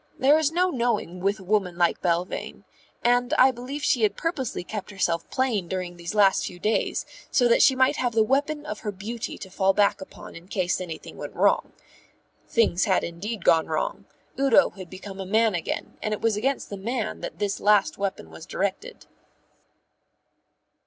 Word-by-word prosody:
There 285 +4 +5
is 310 -1 +1
no 360 +2 +2
knowing 235 - -1
with 200 +3 0
a - - -11
woman 185 -3 0
like 175 -1 +2
Belvane; 175 +1 -2 0.4
and 245 +1 +2
I 260 +1 +6
believe 260 +4 -6
she 255 -4 +2
had 205 -2 +2
purposely 270 - -2
kept 210 +2 -6
herself 170 -4 -1
plain 235 -9 0
during 180 -1 -4
these 170 +3 -6
last 200 -2 +4
few 180 - -6
days 215 +5 0 0.2
so 245 - +3
that 235 - +4
she 265 - +6
might 260 +3 +3
have 245 -2 0
the 220 -1 +4
weapon 290 +5 0
of 210 -7 -5
her 210 - -4
beauty 220 +4 -6
to 190 - -9
fall 195 +1 +2
back 200 -1 +2
upon 190 - -11
in 170 +2 -12
case 185 -2 -1
anything 165 -3 -8
went - - -7
wrong. - - +2 0.7
Things 220 -6 +2
had 190 -4 +2
indeed 195 +4 -5
gone 160 -1 +4
wrong; 155 -1 -2 0.3
Udo 275 0 +5
had 185 -3 -10
become 190 +1 -9
a - - -3
man 220 +3 +2
again; 170 -2 -4
and 215 0 -1
it - - -13
was 225 -2 +2
against 260 +4 -1
the 200 - -4
man 225 +2 -3
that - - -6
this 200 -1 -2
last 205 -2 +3
weapon 190 - -3
was 80 - -11
directed. - - -3
210 Hz, 185 wpm, -25 LUFS, 185-245 Hz, 0.7 s, I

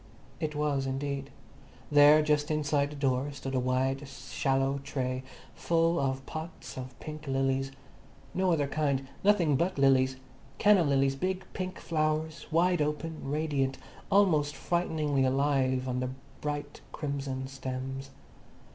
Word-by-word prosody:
It 155 -1 -2
was, 145 -2 0
indeed. 140 +1 -3 0.6
There, 145 +1 +7
just 150 0 +1
inside 145 -2 +1
the 150 - -8
door, 135 0 0
stood 135 -1 -6
a 130 - +2
wide, 130 +2 0
shallow 135 0 -1
tray 130 -2 -2 0.3
full 165 0 +2
of 135 -1 -1
pots 160 +1 -7
of 130 -1 -8
pink 155 -1 -8
lilies. 135 0 0 0.6
No 185 0 +2
other 150 -4 +2
kind. 140 -2 0 0.2
Nothing 190 -8 +4
but 180 +5 0
lilies—canna 135 +7 +2
lilies, 135 -1 +2
big 185 +5 -2
pink 185 0 -4
flowers, 155 0 -1
wide 175 +1 +3
open, 150 0 -2
radiant, 145 -3 0 0.3
almost 160 -8 +3
frighteningly 155 -3 0
alive 130 -1 +2
on 125 +1 -2 0.3
bright 145 -1 -4
crimson 140 -3 -3
stems. 135 0 -5
140 Hz, 125 wpm, -30 LUFS, 135-155 Hz, 0.6 s, There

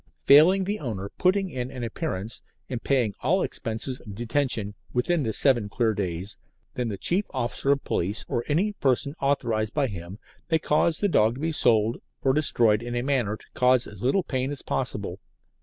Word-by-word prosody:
Failing 170 +7 +7
the 205 +3 -2
owner 105 -8 -4
putting 190 0 +2
in 125 -2 -4
an 125 -2 -6
appearance 115 - -4 0.3
and 120 -2 -4
paying 125 -7 +1
all 180 +9 +2
expenses 120 +2 -2
of 105 -4 -10
detention 115 -3 0 0.2
within 155 +7 +1
the 115 -5 -1
seven 120 -3 +2
clear 115 +1 +1
days, 95 -1 -3 0.4
then 125 -1 -2
the 100 - -4
chief 185 - +2
officer 130 +2 0
of 140 -1 +1
police 100 +6 -2
or 120 - -1
any 180 +8 +1
person 140 - 0
authorised 115 -6 0
by 145 -2 +2
him 95 -4 -7 0.3
may 160 - +4
cause 160 +1 +1
the 205 - +1
dog 115 - +3
to 135 - -8
be 165 +1 0
sold, 115 -6 +3 0.2
or 135 - +3
destroyed 115 -7 +3
in 120 0 -5
a 120 - -1
manner 125 -6 0
to - - -18
cause 125 -1 +3
as 105 -2 -11
little 155 - +2
pain 130 -1 -2
as 145 - -5
possible. 105 -7 -2
125 Hz, 190 wpm, -26 LUFS, 110-145 Hz, 0.4 s, Failing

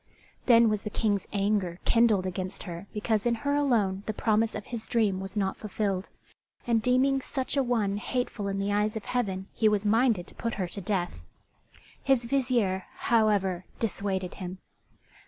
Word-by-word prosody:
Then 235 -2 +7
was 215 -2 +1
the 210 - -4
King's 205 -2 0
anger 200 -3 0
kindled 225 -5 +4
against 185 0 -4
her 175 +2 -7
because 215 +1 0
in 235 - +2
her 285 - +2
alone 225 -10 +2
the 215 - -2
promise 220 0 +1
of 210 - -5
his 230 -2 -6
dream 215 -5 +1
was 195 +2 -6
not 190 -2 0
fulfilled; 200 -2 -2 0.6
and 230 -2 +2
deeming 260 +3 +3
such 265 0 -3
a 275 - +3
one 220 -6 0
hateful 235 -2 -2
in 195 0 -2
the 200 +1 0
eyes 210 +1 +1
of 220 - -5
Heaven 195 -7 -1
he 220 - +3
was 210 0 0
minded 220 -3 +3
to - - -14
put 230 -1 -3
her 185 -3 -2
to 200 - -5
death. 175 - -2 0.8
His 265 -3 +2
vizier, 235 -8 +1
however, 200 -5 +2
dissuaded 195 -4 -2
him. 185 0 -5
210 Hz, 175 wpm, -28 LUFS, 195-235 Hz, 0.8 s, Then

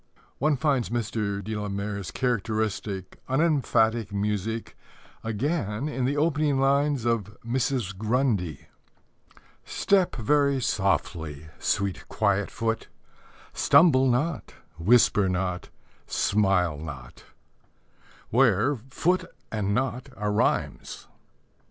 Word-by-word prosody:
One 150 +1 +2
finds 135 -4 +1
Mr. 105 -3 -2
de 110 +3 -4
la 105 -1 -3
Mare's 100 -1 -4
characteristic, 110 -5 -2
unemphatic 120 - +2
music 105 +2 -2 0.5
again 115 - -2
in 135 -4 -2
the 140 +3 0
opening 150 -2 +2
lines 140 -1 +2
of 110 -3 -1
Mrs. 120 -4 -1
Grundy: 110 - 0 1.0
Step 195 -3 +1
very 140 +3 +2
softly, 80 - -1
sweet 100 -1 -1
Quiet 100 -2 +1
foot, 115 0 -2 0.7
Stumble 135 -6 +5
not, 135 +1 -1 0.2
whisper 105 0 +4
not, 90 -1 -2 0.4
smile 95 -6 +1
not, 70 -6 -9 1.1
where 125 +2 +3
"foot" 180 +6 +1 0.3
and 100 -2 -1
"not" 130 +1 -2
are 105 0 -1
rhymes. 105 - -1
110 Hz, 95 wpm, -26 LUFS, 100-135 Hz, 1.1 s, Stumble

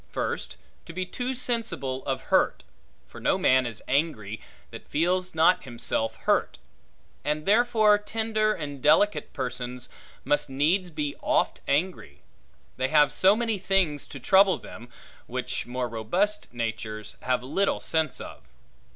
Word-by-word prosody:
First, - - -3 0.3
to 170 - -8
be 185 +2 -2
too 250 +7 -4
sensible 190 - -1
of 135 -1 -1
hurt; - - +3 0.4
for - - -12
no - - +2
man 130 -1 +3
is 115 -3 -8
angry, 120 -8 -1 0.3
that - - -10
feels 180 +3 0
not 165 +3 +4
himself 115 -2 -2
hurt; - - +1 0.7
and 150 +1 -1
therefore 215 -1 +4
tender 215 0 0
and 145 -8 -5
delicate 205 +9 +3
persons 125 -2 -4 0.3
must 145 +1 +1
needs 165 +8 +1
be 150 -3 -3
oft - - +1
angry; 145 - -1 0.5
they 130 +1 +1
have 150 -1 +4
so 195 +2 +5
many 225 -3 -1
things 185 -7 0
to 140 - -9
trouble 190 +7 +5
them, 120 +2 -11 0.4
which 125 0 -3
more 125 0 -2
robust 175 - -1
natures 110 -2 -5
have 125 -1 0
little 195 +10 0
sense 160 -1 0
of. - - -9
150 Hz, 140 wpm, -26 LUFS, 125-195 Hz, 0.7 s, so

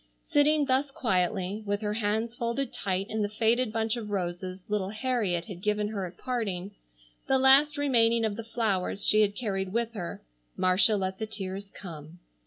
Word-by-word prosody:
Sitting 295 0 +4
thus 270 +1 +1
quietly, 195 -4 0
with 205 +1 -1
her 210 -1 -1
hands 220 +2 -1
folded 235 +2 -2
tight 190 0 -1
in 220 0 -2
the 205 - 0
faded 225 +2 +2
bunch 225 0 0
of 225 -3 -6
roses 185 -1 -3
little 205 -2 -1
Harriet 215 -6 -1
had 185 -5 -9
given 210 +1 0
her 200 -4 -3
at 175 - -13
parting, 205 -7 -3 0.6
the 265 - +4
last 275 +3 +6
remaining 235 -5 +3
of 210 -2 -1
the 230 - -5
flowers 205 -4 -1
she 215 - +5
had 205 -1 +2
carried 195 -5 -2
with 235 0 -1
her, 180 -6 -6 0.3
Marcia 185 +4 +4
let 190 -1 -3
the 220 - -3
tears 195 -2 -6
come. 165 -4 -10
210 Hz, 180 wpm, -28 LUFS, 190-235 Hz, 0.6 s, last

